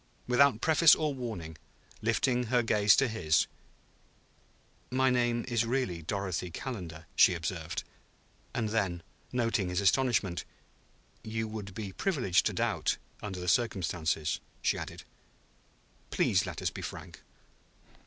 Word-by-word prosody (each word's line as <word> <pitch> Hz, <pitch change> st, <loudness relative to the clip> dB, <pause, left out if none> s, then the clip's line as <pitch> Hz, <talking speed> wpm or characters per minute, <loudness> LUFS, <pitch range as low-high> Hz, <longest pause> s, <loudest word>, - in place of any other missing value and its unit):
Without 125 Hz, -1 st, +4 dB
preface 160 Hz, 0 st, +6 dB
or 155 Hz, -2 st, -1 dB
warning, 95 Hz, -, -6 dB, 0.4 s
lifting 120 Hz, +3 st, +1 dB
her 120 Hz, +1 st, +2 dB
gaze 105 Hz, -2 st, +5 dB
to 135 Hz, -, +3 dB
his, 85 Hz, -8 st, +2 dB, 1.4 s
"My 130 Hz, 0 st, +2 dB
name 120 Hz, -1 st, +1 dB
is 120 Hz, -2 st, +1 dB
really 115 Hz, -8 st, -1 dB
Dorothy 90 Hz, 0 st, -3 dB
Calendar," 85 Hz, -6 st, -6 dB
she 90 Hz, -, +6 dB
observed. 85 Hz, -1 st, -4 dB, 0.7 s
And 110 Hz, -2 st, -1 dB
then, 95 Hz, -6 st, -1 dB, 0.3 s
noting 115 Hz, -6 st, 0 dB
his 90 Hz, +1 st, 0 dB
astonishment, 100 Hz, -3 st, +2 dB, 0.8 s
"You 110 Hz, 0 st, -3 dB
would 105 Hz, -3 st, -7 dB
be 105 Hz, -3 st, -5 dB
privileged 125 Hz, -, +1 dB
to -, -, -2 dB
doubt, -, -, 0 dB, 0.2 s
under 95 Hz, -3 st, -5 dB
the 90 Hz, -, -5 dB
circumstances," 85 Hz, -7 st, 0 dB, 0.2 s
she -, -, +2 dB
added. -, -, -7 dB, 1.1 s
"Please -, -, +2 dB
let -, -, -6 dB
us -, -, 0 dB
be -, -, -7 dB
frank." -, -, -8 dB
110 Hz, 125 wpm, -30 LUFS, 90-125 Hz, 1.4 s, preface